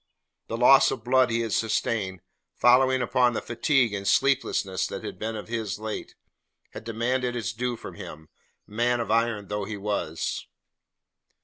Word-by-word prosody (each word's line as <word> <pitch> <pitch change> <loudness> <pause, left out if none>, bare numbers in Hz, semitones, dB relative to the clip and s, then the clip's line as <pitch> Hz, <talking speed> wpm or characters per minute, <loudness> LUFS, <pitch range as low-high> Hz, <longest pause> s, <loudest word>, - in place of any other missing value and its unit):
The 115 - -4
loss 130 +3 +6
of 110 - -4
blood 130 +1 +3
he 115 0 0
had 115 -2 -2
sustained, 105 -4 -1 0.3
following 130 +1 +4
upon 125 0 +2
the - - -1
fatigue 120 -1 +1
and 100 -1 -4
sleeplessness 100 -7 +1
that - - -6
had - - -7
been 110 +1 -3
his 110 -2 -3
of 105 - -14
late, 110 -1 -5 0.6
had - - -9
demanded 120 +2 -1
its 115 -2 -3
due 120 +2 -2
from - - -9
him, 80 0 -10 0.4
man 120 +3 0
of 115 -3 -2
iron 115 -3 +1
though 105 0 -3
he 105 +1 -5
was. 100 -5 -3
115 Hz, 165 wpm, -26 LUFS, 105-125 Hz, 0.6 s, loss